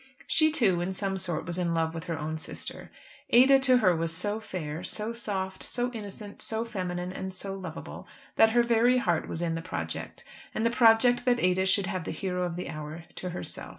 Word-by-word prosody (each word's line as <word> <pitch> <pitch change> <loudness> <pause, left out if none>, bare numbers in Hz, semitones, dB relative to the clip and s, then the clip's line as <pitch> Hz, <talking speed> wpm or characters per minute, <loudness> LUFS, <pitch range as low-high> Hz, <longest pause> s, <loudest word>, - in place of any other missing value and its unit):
She 315 -1 +4
too 200 - +2
in 185 +2 -2
some 195 0 -1
sort 175 -3 -1
was 175 +1 -1
in 170 -2 0
love 160 0 0
with 165 0 -6
her 165 -2 -3
own 155 +1 -3
sister. - - -7 0.4
Ada 265 +3 +7
to 260 -1 +4
her 185 -7 +4
was 165 0 -1
so 205 +6 -2
fair, 170 -6 -5
so 215 +4 -3
soft, 190 -5 -3
so 245 0 -2
innocent, 205 -2 -8
so 225 +1 -2
feminine 180 -5 -4
and 190 0 -5
so 195 +1 -5
lovable, 185 -4 -7 0.3
that 225 - +6
her 240 0 +5
very 235 +2 +4
heart 175 -9 +1
was 165 - -3
in 165 -1 0
the 165 - -3
project, - - -5 0.3
and 220 - 0
the 230 - +3
project 240 +1 +5
that 245 -1 +3
Ada 185 0 +2
should 195 +1 +2
have 185 -4 -3
the - - -4
hero 180 +2 -2
of 175 -2 -1
the 180 - -4
hour 155 +2 -6
to 180 - -4
herself. 175 - -5
190 Hz, 215 wpm, -28 LUFS, 175-225 Hz, 0.4 s, Ada